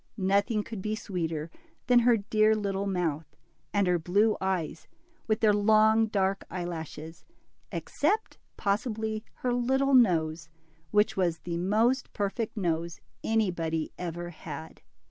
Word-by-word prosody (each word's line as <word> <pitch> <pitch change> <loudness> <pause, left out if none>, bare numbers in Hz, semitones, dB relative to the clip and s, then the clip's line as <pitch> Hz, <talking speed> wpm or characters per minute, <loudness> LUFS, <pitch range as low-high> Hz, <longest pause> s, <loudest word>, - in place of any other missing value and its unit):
Nothing 200 +2 +1
could 220 -3 -7
be 215 +2 -2
sweeter 165 -6 -3 0.3
than 245 -1 +5
her 240 -1 +4
dear 215 +1 +3
little 200 -1 -2
mouth, 165 -5 -1 0.4
and 200 -1 +2
her 180 -1 +2
blue 205 +6 +2
eyes, 180 -5 -2 0.4
with 215 0 +1
their 215 -2 +5
long, 220 +2 +4
dark 195 -2 0
eyelashes. 165 -2 -6
DIMPLE. 340 - -37
47 - - -3 0.4
except 440 - -25 0.2
possibly 215 +1 -1
her 250 -1 -1
little 265 +3 +1
nose, 165 - +3 0.4
which 210 +4 +2
was 175 -3 +1
the 170 0 -4
most 220 +8 +1
perfect 215 +3 -2
nose 170 -3 -1 0.2
anybody 170 -8 0
ever 175 0 -4
had. 160 -1 -9
200 Hz, 135 wpm, -28 LUFS, 170-220 Hz, 0.4 s, than